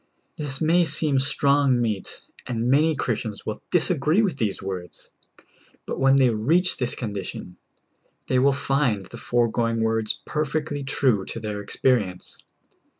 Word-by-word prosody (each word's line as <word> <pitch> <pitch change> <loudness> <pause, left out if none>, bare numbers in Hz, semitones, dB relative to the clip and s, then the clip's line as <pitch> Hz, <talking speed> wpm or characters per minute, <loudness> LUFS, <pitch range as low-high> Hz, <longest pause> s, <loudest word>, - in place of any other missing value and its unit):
This 145 -3 -3
ma}^ 165 +3 +3
seem 150 -2 +2
strong 140 -1 +2
meat, 110 -5 -3 0.3
and 120 0 -1
many 155 +3 +3
Chris 125 -4 -1
tians 105 -4 -7
will 110 - -4
disagree 165 +2 +2
with 180 -9 -1
these 105 -6 -1
words, 95 -3 -7 0.7
but - - -4
when 135 0 +5
they 130 -3 +4
reach 160 - +2
this 125 -2 -1
condition, 100 -5 -6 0.7
they 130 - +2
will 140 +2 +4
find 135 -7 0
the 120 - -11
foregoing 115 -1 0
words 110 -1 0
perfectly 150 -1 -2
true 130 -6 +1
to - - -6
their 105 -2 -4
experience. 100 -3 -1
125 Hz, 145 wpm, -24 LUFS, 110-145 Hz, 0.7 s, when